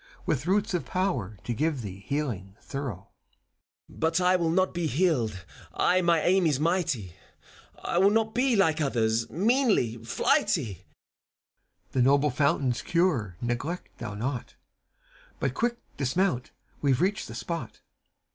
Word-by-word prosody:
With 145 +2 -1
roots 195 +1 +1
of 175 - 0
power 130 - -2
to 120 - -2
give 145 0 -1
thee 95 -2 -7
healing 105 -7 -3
thorough. 140 -4 -4
^8 - - -14
FAUST. 95 - -22
FAUST. - - -24
But 165 +2 +2
I 180 +1 +4
will 170 -2 +1
not 185 +3 +2
be 170 -2 -1
healed 125 - 0 0.3
I 185 +1 +3
my 170 -2 +3
aim 185 -1 +4
is 145 -4 +1
mighty: 160 - 0 0.7
I 170 - 0
will 195 +2 +6
not 220 +1 +1
be, 250 +1 +2
like 160 -6 +3
others, 115 -5 +1
meanly 210 - +2
flighty 175 - +1
I - - -6
CHIRON. 90 - -17 1.1
The 130 - +1
noble 140 +3 +4
fountain's 130 -2 +1
cure 145 - 0
neglect 120 +9 -4
thou 110 -3 -5
not: 125 +3 -4 0.8
But 135 - 0
quick 235 - 0 0.2
dismount 140 -1 0
I - - -40
We've 135 -3 +2
reached 195 +3 0
the - - -8
spot. 165 -9 -4
FAUST. - - -27
150 Hz, 160 wpm, -27 LUFS, 120-185 Hz, 1.1 s, will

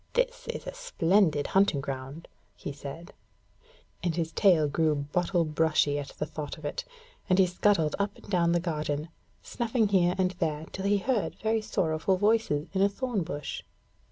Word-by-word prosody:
'This - - 0
is - - -5
a - - -5
splendid 195 - +2
hunting 195 -7 +3
ground,' 135 +3 -6 0.3
he - - -6
said, 145 +5 -9 0.9
and 170 -3 -1
his 165 -2 -1
tail 170 -5 +4
grew 155 +1 +2
bottle 170 +5 0
brushy 155 -2 +2
at 140 - -5
the - - -1
thought 150 -1 -6
of 155 - -10
it, 145 - -3 0.5
and 185 - +4
he 190 - +6
scuttled 175 -3 +2
up 200 0 -1
and - - -16
down 175 -4 +2
the 175 - +3
garden, 155 -2 -2 0.3
snuffing 235 -2 0
here 180 -3 +3
and 185 -1 +2
there 155 -2 -1
till 190 - -5
he 205 +1 +3
heard 220 +1 -1
very 220 0 0
sorrowful 165 -2 0
voices 205 -7 +2
in 190 - +1
a 200 - +5
thorn 235 0 -2
bush. 145 -3 -5
175 Hz, 175 wpm, -28 LUFS, 150-200 Hz, 0.9 s, he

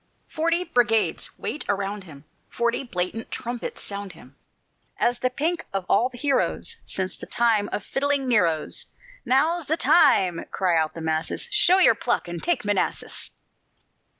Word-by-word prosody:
Forty 335 +2 0
brigades 240 -9 +1
wait 300 - -4
around 200 0 -2
him, 145 -5 -13 0.3
Forty 235 +2 0
blatant 215 -1 -4
trumpets 240 0 -5
sound 200 -2 -3
him, 135 -4 -16 0.6
As 245 0 +1
the 255 - +1
pink 320 +7 -1
of 195 -2 -2
all 250 - +3
the 250 - -12
heroes 275 +1 0
Since 190 -1 -3
the - - -9
time 225 -3 +2
of 210 - -3
fiddling 280 +1 0
Neros. 170 -10 +2 0.4
"Now's 315 +5 +2
the 320 - +1
time," 185 - +4
cry 185 -3 +1
out 160 -1 +1
the 165 - -6
masses, 160 0 -2
"Show 410 -3 +5
your 380 - +6
pluck - - -1
and 175 0 -5
take 345 -9 0
Manassas!" 205 -2 -1
230 Hz, 150 wpm, -24 LUFS, 185-285 Hz, 0.6 s, your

